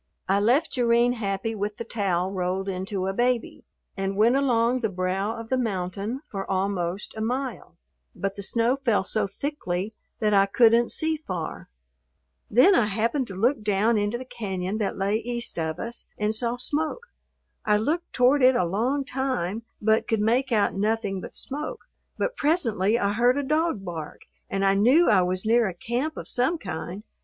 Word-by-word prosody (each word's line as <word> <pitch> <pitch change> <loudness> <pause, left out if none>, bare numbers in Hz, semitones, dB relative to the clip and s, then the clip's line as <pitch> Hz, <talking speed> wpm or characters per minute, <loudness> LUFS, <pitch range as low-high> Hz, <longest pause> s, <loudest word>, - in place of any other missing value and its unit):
I 195 +1 +3
left 250 +10 +2
Jerrine 240 0 +3
happy 205 -1 -2
with 210 0 -3
the - - -4
towel 190 -5 -1
rolled 190 0 -2
into 190 0 -3
a 195 - -1
baby, 240 +2 -1 0.3
and 195 0 -2
went 230 +4 +4
along 250 -2 +2
the 225 -3 -1
brow 190 +3 -1
of 225 0 -8
the 260 - +1
mountain 200 +2 -3
for 195 -2 -5
almost 190 -1 -2
a 220 - -5
mile, 255 +4 -3 0.4
but 195 0 -3
the 200 - -6
snow 235 +5 +1
fell 235 -8 +1
so 210 +1 0
thickly 200 -4 -4 0.2
that 215 -2 +1
I 195 0 +5
couldn't 230 +3 +4
see 315 0 +1
far. 185 - -6 0.8
Then 255 - +6
I 240 - +3
happened 230 +6 0
to 195 - -8
look 240 +7 +1
down 210 +2 +2
into 205 +3 -1
the 255 - -8
cañon 195 -3 -4
that 205 - -2
lay 200 +2 +1
east 235 -4 -4
of 160 0 -2
us 235 +1 -5
and 210 +1 0
saw 235 +2 +2
smoke. 315 - -2 0.6
I 210 -2 +3
looked 315 +11 -1
toward 260 +3 +3
it 255 0 +6
a 180 - +2
long 245 +10 0
time, 255 -7 -2 0.2
but 220 +1 +2
could 225 - +1
make 245 +5 +1
out 210 -3 +2
nothing 205 -1 -1
but - - -9
smoke, 300 - -5 0.4
but - - -1
presently 235 - +2
I 200 -3 0
heard 245 +4 +3
a 285 - 0
dog 305 -7 0
bark 165 -4 -6 0.3
and 195 0 0
I 195 - +4
knew 250 - +5
I 195 -3 +5
was 185 +2 -1
near 230 0 +4
a 185 - -5
camp 245 - -3
of - - -6
some 265 +7 +1
kind. 180 - -6
220 Hz, 185 wpm, -25 LUFS, 195-250 Hz, 0.8 s, Then